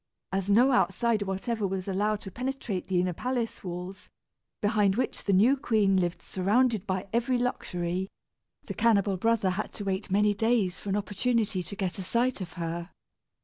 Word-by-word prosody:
As 195 0 -1
no 240 +7 +5
outsider 235 -3 +2
whatever 200 +3 -2
was 190 0 -3
allowed 205 +2 0
to 195 - -8
penetrate 250 -5 -3
the 185 -2 +1
inner 180 0 0
palace 245 +3 -3
walls, 180 +1 -7 0.5
behind 205 -2 +2
which 255 - -2
the 200 - +2
new 215 +8 +5
queen 215 -7 +2
lived 175 -2 0
surrounded 215 +2 +1
by 185 -1 -1
every 240 +2 +2
luxury, 185 -6 -2 0.6
the - - -5
cannibal 205 -4 +3
brother 220 -1 +2
had 200 +4 -3
to 205 - -6
wait 195 +1 -2
many 205 +2 +3
days 220 -3 +1
for 205 - -7
an 195 - +1
opportunity 210 0 0
to 200 - -7
get 190 -1 -3
a - - -3
sight 240 +3 0
of 175 -2 -6
her. 170 0 -4
200 Hz, 175 wpm, -28 LUFS, 185-230 Hz, 0.6 s, no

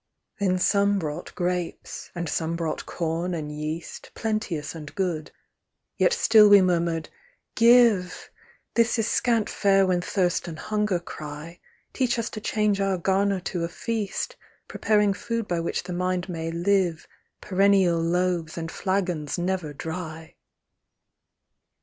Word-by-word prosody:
Then 185 -2 +2
some 200 +2 +3
brought 160 -2 -5
grapes, 180 -1 -3
and 175 -1 -3
some 160 +2 -1
brought 165 -2 -3
corn 170 +1 -2
and 150 -2 -4
yeast. 155 +2 -6
Plenteous 215 -9 -2
and 150 -3 -9
good; 175 -6 -2 0.7
yet - - +3
still 225 - +6
we 205 0 +9
murmured, 170 -3 0 0.2
" - - -45
Give! 230 -7 +4 0.4
This 235 +1 +2
is 225 -1 +1
scant 230 -3 +1
fare 195 -1 +3
when 180 -1 +1
thirst 180 -1 0
and 165 -2 -6
hunger 210 -3 -1
cry: 155 0 -8 0.3
Teach 250 -2 +1
us 230 -1 -2
to 215 - -6
change 210 -2 +1
our 195 -1 +1
garner 195 +2 +1
to 175 -1 -3
a 170 - -2
feast, 220 +2 -3 0.3
Preparing 210 -2 +2
food 230 +2 -3
by 175 -1 -1
which 165 - -2
the 180 0 -6
mind 180 0 -1
may 165 -2 -4
live, 175 -1 0 0.3
Perennial 190 -3 +3
loaves, 170 -1 0
and 165 -1 -4
flagons 180 -7 -1
never 180 -3 -2
dry." 160 +1 -7
180 Hz, 140 wpm, -25 LUFS, 165-200 Hz, 0.7 s, we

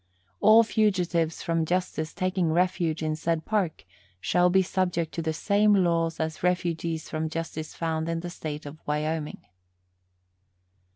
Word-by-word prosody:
All 220 +2 +7
fugitives 180 -7 +1
from 165 -1 0
justice 170 -2 -1
taking 185 -3 0
refuge 170 -2 +1
in 155 0 0
said 160 0 -1
Park 195 - -1 0.3
shall 175 - +3
be 190 +1 +4
subject 180 -3 -1
to 165 - -2
the 160 0 -1
same 205 +5 +3
laws 170 -3 +1
as 160 -1 -3
refugees 170 -2 -1
from 155 0 -2
justice 160 -1 -5
found 160 -1 -2
in 165 0 -2
the 175 0 -6
State 150 -3 -6
of 145 +2 -9
Wyoming. 150 -3 -2
165 Hz, 140 wpm, -27 LUFS, 160-180 Hz, 0.3 s, All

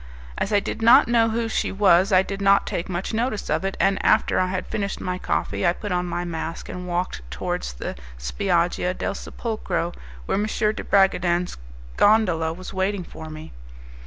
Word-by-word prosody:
As 200 - -2
I 205 - +4
did 215 - -5
not 230 +1 +7
know 230 -1 +3
who 230 +1 -1
she 225 - -1
was 195 -1 +4
I 185 0 +5
did 195 0 -5
not 200 0 +4
take 170 - -3
much 185 +4 -3
notice 225 -2 -1
of - - +1
it, 195 0 -2
and 195 0 +2
after - - +3
I 185 - +2
had 185 0 -3
finished 200 -3 -3
my 180 0 -3
coffee - - -2
I 175 -1 +4
put 205 +2 -6
on 180 0 0
my 175 0 -3
mask 165 -1 -5
and 180 0 -6
walked 175 - -2
towards 60 0 -3
the - - -5 0.2
Spiaggia 175 - 0
del - - -2
Sepulcro, 195 -6 -3 0.3
where 195 - 0
M. 210 - +1
de 215 -1 -1
Bragadin's 180 -2 +2 0.4
gondola 180 -7 +3
was 185 +3 -8
waiting 190 0 -1
for 160 -1 -10
me. 155 0 -9
185 Hz, 190 wpm, -23 LUFS, 175-205 Hz, 0.4 s, not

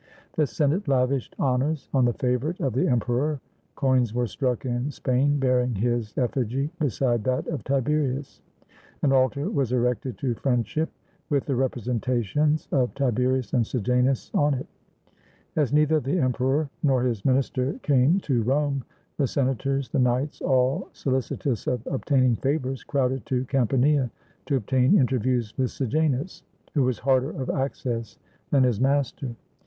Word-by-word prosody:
The 155 -2 +1
Senate 150 +7 0
lavished 130 -1 +1
honors 135 +3 0
on 130 -3 +4
the 120 - +2
favorite 125 - -1
of 135 -5 -1
the 130 - +1
emperor; 125 +5 0 0.4
coins 130 -4 +1
were 125 0 +1
struck 125 +1 -2
in 120 +2 -1
Spain 140 +1 +1
bearing 125 -3 +1
his 115 +1 -1
effigy 130 +3 -1
beside 125 - 0
that 130 0 0
of 155 - -3
Tiberius. 140 0 -1 0.6
An 140 - +4
altar 130 +2 +2
was 135 -4 0
erected 125 +1 0
to 130 -5 -1
friend 125 -1 0
ship, 155 +10 -2 0.4
with 140 -3 +1
the 140 - -1
representations 125 +3 0
of 130 -2 +1
Tiberius 130 -2 0
and 125 - +3
Sejanus 125 +3 0
on 145 -1 +3
it. 130 - -4 0.9
As 150 -5 +1
neither 150 +1 +4
the 140 +6 -1
emperor 130 +1 +1
nor 130 -4 +2
his 115 -6 -1
minister 130 0 +1
came 145 +6 +4
to 130 -8 0
Rome, 140 +3 0 0.3
the 140 - +2
senators, 135 +1 -1
the - - 0
knights, 125 +3 0
all 130 +1 +1
solicitous 130 -2 -2
of 125 -2 -1
obtain 135 0 +1
ing 125 -2 +3
favors, 135 -2 -1
crowded 135 -2 0
to 130 0 0
Campania 135 +1 +2 0.4
to 140 - +1
obtain 130 - +3
interviews 125 -3 +1
with 130 -2 +2
Sejamis, 145 - -1 0.3
who 145 - +2
was 130 -3 +1
harder 130 +1 +2
of 130 - -1
access 120 -4 -3 0.3
than 135 -2 +4
his 125 -4 +1
master. 135 -2 0
130 Hz, 150 wpm, -25 LUFS, 125-140 Hz, 0.9 s, on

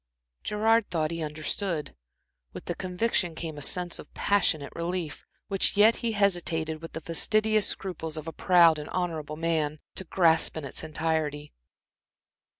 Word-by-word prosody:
Gerard 220 +1 +2
thought 160 -3 -1
he 165 0 -4
understood. 155 +2 -3 0.6
With - - -9
the 175 - -2
conviction 180 -1 -1
came 160 -1 -5
a 145 - -8
sense 175 +4 0
of - - -12
passionate 170 -8 +1
relief, 170 -2 -4 0.2
which 195 0 +1
yet 220 +3 +6
he 230 -1 -2
hesitated, 170 -6 0
with 165 - -9
the 160 - -5
fastidious 215 +6 +2
scruples 165 -4 -4
of 155 +1 -6
a 165 - -5
proud 170 -4 +5
and 150 - -7
honorable 160 -4 -3
man, 160 -2 0 0.2
to - - -6
grasp 165 -3 +3
in 155 - -4
its 140 - -6
entirety. 155 -2 -2
165 Hz, 155 wpm, -27 LUFS, 155-190 Hz, 0.6 s, yet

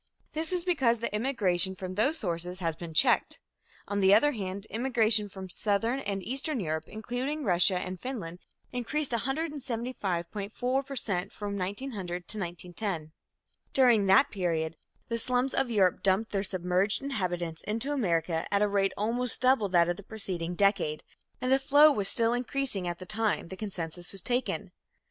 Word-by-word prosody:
This 315 +2 -2
is 360 -1 0
because 270 -10 +3
the 230 -1 -3
immigration 195 -6 +1
from 185 -1 -6
those 270 +11 +2
sources 175 - -3
has 165 -3 -2
been 170 0 -7
checked. 155 - +2 0.5
On 205 0 -1
the 195 +1 +6
other 295 +7 +4
hand, 200 -4 -4
immigration 225 -3 +2
from 190 -1 -8
Southern 215 +7 0
and 200 -6 -3
Eastern 270 - -2
Europe, 160 -4 -2
including 250 +7 -3
Russia 180 -2 +3
and 185 0 -4
Finland, 200 -10 -5 0.3
increased 260 +4 -1
175.4 245 - -2
per 275 - -6
cent 195 -7 -1
from 205 -1 -5
1900 190 -3 -4
to 215 - -2
1910. 175 -2 -4 0.6
During 240 -6 +5
that 195 +9 +5
period, 165 -4 -1 0.3
the 230 0 -1
slums 250 +3 +1
of 260 - +1
Europe 195 -6 +3
dumped 195 +3 +1
their 195 - 0
submerged 185 +3 0
inhabitants 175 -11 -2
into 230 +7 -2
America 165 - 0
at 200 0 +3
a - - +3
rate 195 -1 +1
almost 235 +4 +1
double 255 -5 +3
that 170 -2 +4
of 175 0 -1
the - - -8
preceding 180 -5 -4
decade, 195 -6 +1 0.4
and 255 - -1
the 265 - +5
flow 290 +3 +6
was 205 -8 +1
still 230 0 +4
increasing 245 -6 -2
at 175 0 -3
the 185 - -9
time 215 -3 -1
the 200 +2 -5
census 175 0 -5
was 195 -2 -1
taken. 250 +1 -1
205 Hz, 165 wpm, -29 LUFS, 180-250 Hz, 0.6 s, the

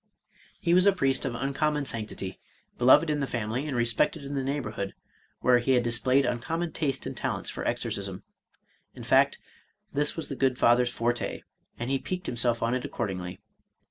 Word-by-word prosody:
He 170 - +1
was 185 +2 +5
a - - +8
priest 135 -8 +1
of 125 -3 -2
uncommon 145 +3 0
sanctity, 105 -5 -4 0.4
beloved 130 +6 +6
in 150 - 0
the 140 - -1
family, 120 +5 -2
and 135 -4 -2
respected 120 +6 +1
in 140 +1 -6
the 135 -1 -1
neighborhood, 110 -8 -3 0.5
where 125 -1 +5
he 130 +2 +2
had 125 -1 +3
displayed 130 +3 +2
uncommon 160 +8 -2
taste 145 -4 -1
and - - -5
talents - - -2
for - - -5
exorcism; - - -2 0.4
— - - -41
in - - -9
fact, - - +4 0.6
this 145 +1 +1
was 160 - -3
the 140 - -5
good 130 -1 +1
Father's 120 +1 +4
forte^ 120 0 -2 0.3
and 120 +3 -3
he 135 - +1
piqued 180 +3 -4
himself 120 -1 0
on 115 +1 +1
it 130 -1 -1
accordingly. 90 -2 -4
130 Hz, 180 wpm, -28 LUFS, 120-145 Hz, 0.6 s, a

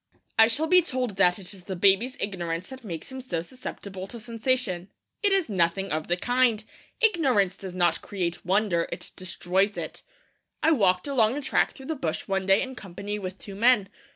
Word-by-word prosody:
I 225 - +9
shall 290 +8 0
be 360 +3 +6
told 250 - -2
that 180 -2 +4
it 195 0 -6
is 185 -2 -12
the 190 - -4
baby's 200 +8 +3
ignorance 175 -3 -3
that 265 -1 -10
makes 170 0 -6
him 260 0 -6
so 175 -10 -3
susceptible 195 -4 -7
to 235 - -8
sensation. 230 -5 -1 0.3
It 410 -2 +3
is 390 -3 +2
nothing 195 0 0
of 155 0 -2
the 175 - +1
kind. 245 0 +2 0.4
Ignorance 270 - +3
does 190 -2 -8
not 175 -2 +2
create 175 -4 -3
wonder; 185 -2 +1
it - - -5
destroys 185 +2 0
it. - - -5 0.6
I 320 - +5
walked 190 - +3
along 250 -2 +2
a - - -2
track - - +2
through 265 - -11
the 320 - -2
bush 160 - -3
one 195 -1 -1
day 195 +1 +5
in 260 -1 -6
company 205 -1 -6
with 185 -1 -6
two 200 - -10
men. 215 -1 +4
200 Hz, 195 wpm, -26 LUFS, 185-255 Hz, 0.6 s, I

